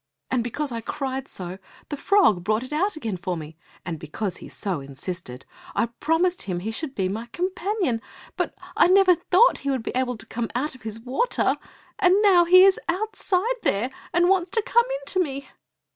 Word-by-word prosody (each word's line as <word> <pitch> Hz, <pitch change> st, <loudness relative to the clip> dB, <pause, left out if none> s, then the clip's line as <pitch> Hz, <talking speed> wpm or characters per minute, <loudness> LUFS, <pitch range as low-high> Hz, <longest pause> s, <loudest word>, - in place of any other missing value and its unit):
And 250 Hz, -2 st, +1 dB
because 275 Hz, +4 st, -3 dB
I 230 Hz, -1 st, -4 dB
cried 265 Hz, +3 st, -4 dB
so, 185 Hz, 0 st, -6 dB, 0.3 s
the 290 Hz, -, -2 dB
frog 285 Hz, -, +3 dB
brought 215 Hz, +4 st, +1 dB
it 260 Hz, -, -7 dB
out 380 Hz, +6 st, +1 dB
again 225 Hz, -11 st, -4 dB
for 180 Hz, -1 st, -3 dB
me, 155 Hz, 0 st, -8 dB, 0.3 s
and 165 Hz, -3 st, -4 dB
because 180 Hz, +6 st, -4 dB
he -, -, -11 dB
so 190 Hz, -6 st, -3 dB
insisted, 140 Hz, 0 st, -7 dB, 0.3 s
I 230 Hz, -, +1 dB
promised 350 Hz, +3 st, +1 dB
him 175 Hz, -3 st, -3 dB
he 220 Hz, +4 st, -3 dB
should 270 Hz, +4 st, -5 dB
be 190 Hz, -2 st, 0 dB
my 220 Hz, +5 st, -4 dB
companion, 365 Hz, -, -1 dB, 0.3 s
but -, -, -2 dB, 0.2 s
I -, -, +6 dB
never 375 Hz, 0 st, +6 dB
thought 360 Hz, +7 st, +3 dB
he 280 Hz, -, -3 dB
would 260 Hz, -4 st, -1 dB
be -, -, -3 dB
able 250 Hz, -2 st, -1 dB
to 225 Hz, -, -5 dB
come 230 Hz, 0 st, -4 dB
out 275 Hz, +4 st, -1 dB
of 260 Hz, -, -15 dB
his 220 Hz, 0 st, -6 dB
water! 255 Hz, -, +1 dB, 0.4 s
And 380 Hz, -1 st, +5 dB
now 365 Hz, -4 st, +6 dB
he 365 Hz, +2 st, +8 dB
is 385 Hz, 0 st, +5 dB
outside 415 Hz, +4 st, 0 dB
there, 225 Hz, +7 st, 0 dB, 0.2 s
and 345 Hz, +1 st, +3 dB
wants 370 Hz, -2 st, +2 dB
to 445 Hz, -, +3 dB
come 475 Hz, +2 st, +3 dB
in -, -, -4 dB
to 370 Hz, -, 0 dB
me." 280 Hz, -5 st, -2 dB
265 Hz, 200 wpm, -24 LUFS, -, 0.4 s, he